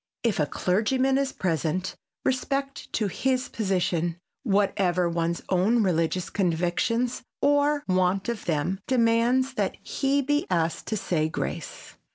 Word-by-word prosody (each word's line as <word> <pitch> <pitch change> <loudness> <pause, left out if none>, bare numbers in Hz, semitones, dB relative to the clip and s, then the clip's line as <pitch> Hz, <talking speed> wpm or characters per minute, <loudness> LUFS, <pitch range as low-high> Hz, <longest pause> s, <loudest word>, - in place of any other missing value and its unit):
If 230 -7 +1
a 150 - +2
clergyman 255 - +1
is 275 -1 0
present, 175 +1 -1 0.3
respect 275 +1 -2
to 220 - +1
his 255 +6 0
position, 175 -5 0 0.2
whatever 195 -4 +2
one's 170 0 -1
own 205 +5 +3
religious 175 -1 0
convictions 195 +7 0 0.2
or 290 +1 +3
want 185 +1 +1
of 235 -3 -3
them, 175 +3 0
demands 245 +1 +3
that - - -1
he 275 0 0
be 290 +2 0
asked 170 -2 0
to 220 - -1
say 160 -5 0
grace. - - -5
195 Hz, 130 wpm, -26 LUFS, 175-255 Hz, 0.3 s, own